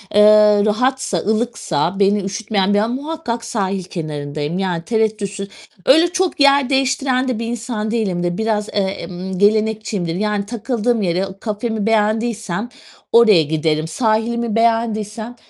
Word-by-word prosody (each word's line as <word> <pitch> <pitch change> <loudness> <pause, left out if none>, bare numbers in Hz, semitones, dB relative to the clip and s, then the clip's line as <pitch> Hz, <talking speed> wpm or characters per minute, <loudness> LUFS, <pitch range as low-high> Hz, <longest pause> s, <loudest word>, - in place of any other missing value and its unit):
eee, 210 0 +6
rahatsa, 250 -1 0
ılıksa 200 -5 -1
beni 200 +1 +3
üşütmeyen 200 0 -1
bir 205 - +3
a 215 - +1
muhakkak 255 -2 -4
sahil 195 -4 -2
kenarındayım. 150 -1 -4
Yani 180 -4 -2
tereddütsüz. 210 -2 -1 0.4
Öyle 320 +6 +6
çok 370 -1 -1
yer 280 -2 +4
değiştiren 265 -1 +1
de 245 -4 -2
bir 230 - -3
insan 230 -2 -3
değilimdir. 180 -6 -1
Biraz, 220 -1 -1
eee, - - -11
emm, 190 -1 -4
gelenekçiyimdir. 210 -3 +1
Yani 210 +1 -1
takıldığım 235 +1 -1
yere, 185 0 0
kafemi 220 0 -3
beğendiysem 220 -1 0 0.4
oraya 215 -8 +6
giderim. 155 +1 -1
Sahilimi 225 +4 0
beğendiysem 225 0 0
215 Hz, 130 wpm, -18 LUFS, 195-235 Hz, 0.4 s, eee